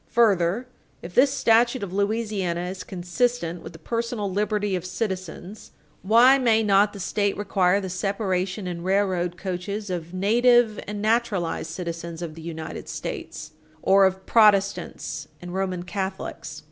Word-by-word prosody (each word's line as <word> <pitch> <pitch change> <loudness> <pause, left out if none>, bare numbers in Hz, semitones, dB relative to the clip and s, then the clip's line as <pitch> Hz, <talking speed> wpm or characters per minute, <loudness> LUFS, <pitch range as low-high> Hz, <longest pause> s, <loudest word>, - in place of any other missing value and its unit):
Further, 205 -1 +2 0.4
if 170 +1 -8
this 265 +6 +5
statute 235 +1 +3
of 185 -2 -5
Louisiana 200 -4 -1
is 185 +1 -5
consistent 180 -1 -2
with - - -10
the - - -10
personal 230 +2 -3
liberty 205 -1 0
of 180 - -3
citizens, 185 0 -5 0.3
why 240 +7 +6
may 225 -3 +3
not 205 0 +4
the 200 - -10
State 200 +2 -1
require 195 -2 +2
the 190 - -5
separation 190 0 -2
in 175 -1 -4
railroad 185 -2 0
coaches 195 +2 -4
of 170 -2 -4
native 225 +3 +3
and 205 0 -4
naturalized 215 -8 0
citizens 170 0 -5
of 165 -2 -5
the 165 - -11
United 160 -1 -7
States, - - -6 0.3
or 195 0 +6
of 190 0 -5
Protestants 205 -3 +2
and 175 0 -8
Roman 185 -2 -2
Catholics? 190 +1 -5
195 Hz, 145 wpm, -24 LUFS, 180-215 Hz, 0.4 s, why